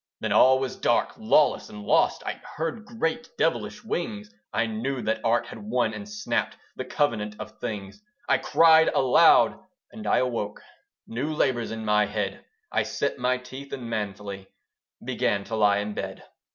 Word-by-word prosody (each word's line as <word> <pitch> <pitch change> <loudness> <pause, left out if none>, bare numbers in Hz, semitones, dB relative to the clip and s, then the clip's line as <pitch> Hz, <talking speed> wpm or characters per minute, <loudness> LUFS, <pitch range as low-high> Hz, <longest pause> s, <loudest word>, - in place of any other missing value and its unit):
Then - - -2
all 130 +1 +6
was 130 -1 -3
dark, - - +1
lawless, - - +2
and 105 0 -9
lost: - - +2
I - - -4
heard 165 +8 -3
great 230 0 -2
devilish - - -1
wings: 105 - -4 0.2
I 115 - +1
knew 120 +4 -3
that 110 - -1
Art 120 0 +2
had 115 - -9
won, 210 +2 0
and 205 - -7
snapt 210 0 -2 0.2
The 130 - -5
Covenant 115 -7 -1
of 110 0 -9
Things. 100 - -6 0.3
I - - +3
cried 160 -1 +5
aloud, 135 +5 +5 0.3
and 220 -1 -8
I - - +3
awoke, 115 -5 -1 0.5
New 130 +7 -3
labours 130 -6 0
in 110 0 -5
my 105 -1 +3
head. 105 -2 -3 0.3
I - - +2
set - - -2
my 125 +1 +1
teeth, 130 +2 -10
and 120 -3 -5
manfully 100 -2 -4 0.6
Began 100 -1 0
to 110 +3 -5
lie 105 -2 +4
in 105 +1 -3
bed. - - -6
120 Hz, 165 wpm, -26 LUFS, 105-145 Hz, 0.6 s, all